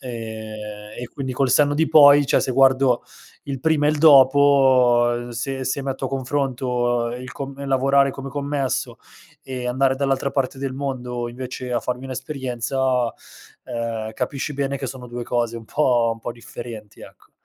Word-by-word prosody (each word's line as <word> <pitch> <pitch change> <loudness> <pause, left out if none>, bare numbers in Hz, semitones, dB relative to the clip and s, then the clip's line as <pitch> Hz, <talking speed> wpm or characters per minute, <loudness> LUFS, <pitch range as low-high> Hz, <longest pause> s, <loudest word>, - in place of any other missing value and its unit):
ehm, 110 -3 -7
e 125 - -6
quindi 130 -2 -4
col 130 0 0
senno 145 +3 +4
di 160 +2 +2
poi, 145 -1 +7
cioè 140 - +3
se - - -2
guardo 130 -1 +4 0.4
il 140 -1 -4
prima 155 0 +2
e - - +4
il 155 - -2
dopo, 130 -4 +5
se 130 +3 -4
se 135 +2 -2
metto 135 -1 -4
a - - -5
confronto 125 -3 -1
il 125 0 -8
com 140 0 -6
lavorare 135 +1 +3
come 135 +1 -7
commesso 140 -1 -2 0.5
e 125 -2 -5
andare 130 +1 +1
dall'altra 135 0 0
parte 135 -1 -1
del 135 -1 -3
mondo 125 -3 -4
invece 125 +1 -7
a 120 - +2
farmi 125 +2 -4
un'esperienza, 130 -2 -2 0.5
ehm, 115 -2 -4
capisci 140 +4 -3
bene 140 0 -2
che 135 - -4
sono 125 0 -8
2 120 0 -6
cose 120 -1 -1
un 115 - -12
po' 120 -5 +2
un 115 - -16
po' 120 - -5
differenti, 115 -2 -10
ecco. - - -16
130 Hz, 165 wpm, -22 LUFS, 120-140 Hz, 0.5 s, poi